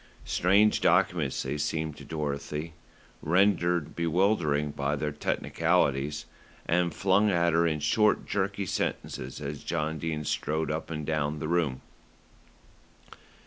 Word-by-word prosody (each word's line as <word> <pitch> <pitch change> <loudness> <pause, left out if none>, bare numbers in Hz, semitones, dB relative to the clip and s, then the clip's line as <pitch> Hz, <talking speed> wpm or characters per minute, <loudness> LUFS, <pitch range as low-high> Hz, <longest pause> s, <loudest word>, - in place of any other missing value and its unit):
Strange 100 +4 +3
documents 85 -5 +2
they 70 +3 -3
seemed 80 0 -2
to - - -11
Dorothy, 75 +1 -4 0.5
rendered 90 -2 +2
bewildering 85 -4 +1
by 70 +1 -1
their 75 0 -2
technicalities, 75 -1 0 0.4
and 85 0 +1
flung 100 +5 +3
at 85 -3 +2
her 85 +1 +3
in 75 -2 -1
short, 105 +9 +2
jerky 100 0 -1
sentences 65 -6 -3
as 75 0 -6
John 80 -1 -2
Dene 75 -1 -3
strode 80 +2 -1
up 80 +1 -4
and 75 -2 -4
down 75 -1 -1
the 75 - -4
room. 80 -6 0
80 Hz, 125 wpm, -28 LUFS, 75-90 Hz, 0.5 s, Strange